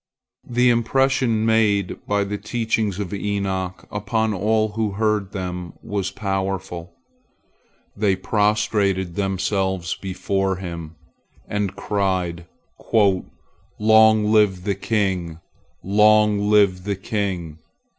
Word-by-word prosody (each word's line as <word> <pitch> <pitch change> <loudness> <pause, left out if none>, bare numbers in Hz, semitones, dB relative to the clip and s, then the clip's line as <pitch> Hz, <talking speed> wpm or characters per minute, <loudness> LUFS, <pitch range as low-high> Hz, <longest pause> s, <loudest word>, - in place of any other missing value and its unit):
The 125 0 +3
impression 120 -1 +1
made 105 -4 +2
by 100 0 +1
the 100 +1 -4
teachings 110 -4 -1
of 100 -1 -4
Enoch 95 -2 -3
upon 110 +2 -1
all 110 +3 +1
who 105 -1 -2
heard 105 -2 0
them 90 -3 -5
was 100 -3 -2
powerful. 95 -3 -4 1.0
They 100 -2 +2
prostrated 105 -2 0
themselves 95 -2 -1
before 95 0 -2
him, 85 -3 -7 0.5
and 105 -2 -2
cried 95 -4 -2 1.3
"Long 110 0 +5
live 105 -4 +3
the 100 0 0
king! 95 -5 -1 0.4
Long 105 +1 +4
live 100 -3 +4
the 100 0 -2
king!" 95 -6 -3
100 Hz, 100 wpm, -22 LUFS, 95-105 Hz, 1.3 s, Long